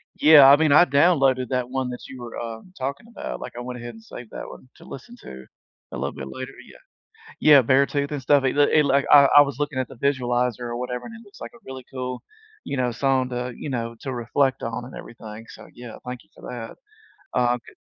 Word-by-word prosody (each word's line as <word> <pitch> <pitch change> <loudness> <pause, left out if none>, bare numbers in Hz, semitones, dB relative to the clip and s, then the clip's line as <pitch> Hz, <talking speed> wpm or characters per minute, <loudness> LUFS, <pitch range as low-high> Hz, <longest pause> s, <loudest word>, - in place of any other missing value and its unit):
Yeah. 150 -3 +8
I 140 - +9
mean, 155 -1 +2
I 165 +5 +7
downloaded 135 -4 +3
that 125 -1 -2
one 130 -1 -2
that 125 - -8
you 130 -2 -10
were, 120 -1 -8
um, 115 +9 -8
talking 140 - -5
about. 235 - -7
Like, - - -8
I - - -5
went 125 0 -7
ahead 120 0 -8
and 110 0 -15
saved 120 0 -11
that - - -7
one 130 - -13
to - - -17
listen 185 - -11
to 65 0 -11 0.5
a - - -6
little - - -3
bit 65 - -7
later. 130 - -7
Yeah. - - -16 0.6
Yeah, 145 -3 +7
Beartooth 140 +3 +1
and 145 -2 -4
stuff, 140 +1 +3
it 130 - 0
l 145 - +5
it, 155 -1 +4
like, 140 0 +2
I 140 -1 +8
I 145 - +11
was 140 -1 -4
looking 145 -2 -2
at 130 - -1
the - - -12
visualizer 125 -3 0
or 120 0 -4
whatever, 125 0 -5
and 230 - -10
it 230 - -12
looks 200 - -18
like - - -8
a - - -15
really 130 -1 -9
cool, 125 -1 -5 0.4
you - - -4
know, 125 -2 0
song 130 +1 0
to, 125 0 -4
you 150 - -6
know, 115 -2 -3
to 135 - -5
reflect 130 +3 0
on 115 +1 -4
and 130 - -11
everything. 110 -1 -10
So, - - -13
yeah, 120 -2 -10
thank 125 -1 -7
you - - -35
for - - -18
that. 120 -2 -8 0.6
Um, 120 0 +2
g - - -16
130 Hz, 240 wpm, -23 LUFS, 120-140 Hz, 0.6 s, I